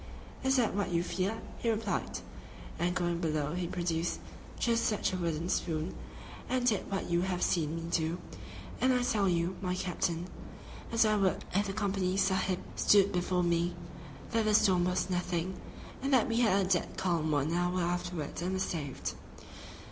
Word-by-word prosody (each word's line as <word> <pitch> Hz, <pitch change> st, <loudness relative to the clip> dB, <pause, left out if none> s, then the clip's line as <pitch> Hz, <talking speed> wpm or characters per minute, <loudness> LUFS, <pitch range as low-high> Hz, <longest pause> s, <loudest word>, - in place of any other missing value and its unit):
"Is 265 Hz, 0 st, +3 dB
that 245 Hz, -4 st, +2 dB
what 200 Hz, -1 st, -1 dB
you 170 Hz, 0 st, +2 dB
fear?" 190 Hz, +5 st, -1 dB, 0.2 s
he 235 Hz, -, 0 dB
replied, 225 Hz, 0 st, -1 dB, 0.6 s
and 175 Hz, +1 st, +1 dB
going 175 Hz, -1 st, 0 dB
below 155 Hz, -3 st, -1 dB
he 180 Hz, 0 st, -2 dB
produced 170 Hz, -1 st, -1 dB, 0.4 s
just 230 Hz, -1 st, +2 dB
such 210 Hz, -3 st, +1 dB
a -, -, 0 dB
wooden 170 Hz, -2 st, -1 dB
spoon 165 Hz, -1 st, -1 dB, 0.6 s
and 255 Hz, -1 st, +1 dB
did 215 Hz, -6 st, +1 dB
what 195 Hz, -, -2 dB
you 170 Hz, 0 st, +3 dB
have 180 Hz, -1 st, -1 dB
seen 160 Hz, -2 st, +1 dB
me 165 Hz, -, -4 dB
do, 165 Hz, +1 st, +1 dB, 0.6 s
and 255 Hz, 0 st, +4 dB
I 250 Hz, -, +2 dB
tell 210 Hz, -5 st, +2 dB
you, 175 Hz, +1 st, 0 dB
my 180 Hz, -1 st, -1 dB
captain, 175 Hz, -2 st, -1 dB, 0.7 s
as 230 Hz, -1 st, +4 dB
I 215 Hz, 0 st, +3 dB
would 195 Hz, -2 st, +1 dB
if 200 Hz, +2 st, +2 dB
the 195 Hz, -, -3 dB
"Company 195 Hz, -2 st, 0 dB
Sahib" 190 Hz, -1 st, +1 dB
stood 200 Hz, -1 st, +5 dB
before 180 Hz, -1 st, +1 dB
me, 170 Hz, 0 st, +1 dB, 0.6 s
that 225 Hz, -1 st, +2 dB
the 215 Hz, -1 st, +4 dB
storm 185 Hz, -4 st, +4 dB
was 180 Hz, 0 st, 0 dB
nothing, 180 Hz, 0 st, -2 dB, 0.4 s
and 275 Hz, +1 st, -1 dB
that 255 Hz, -, +4 dB
we 230 Hz, -1 st, +1 dB
had 200 Hz, -5 st, +4 dB
a -, -, -3 dB
dead 180 Hz, -2 st, 0 dB
calm 170 Hz, -4 st, +1 dB
one 145 Hz, +1 st, +1 dB
hour 175 Hz, +1 st, +1 dB
afterwards 175 Hz, -3 st, -2 dB
and 180 Hz, +2 st, -1 dB
were 190 Hz, -, -1 dB
saved. 150 Hz, -7 st, -3 dB
180 Hz, 180 wpm, -31 LUFS, 170-200 Hz, 0.7 s, stood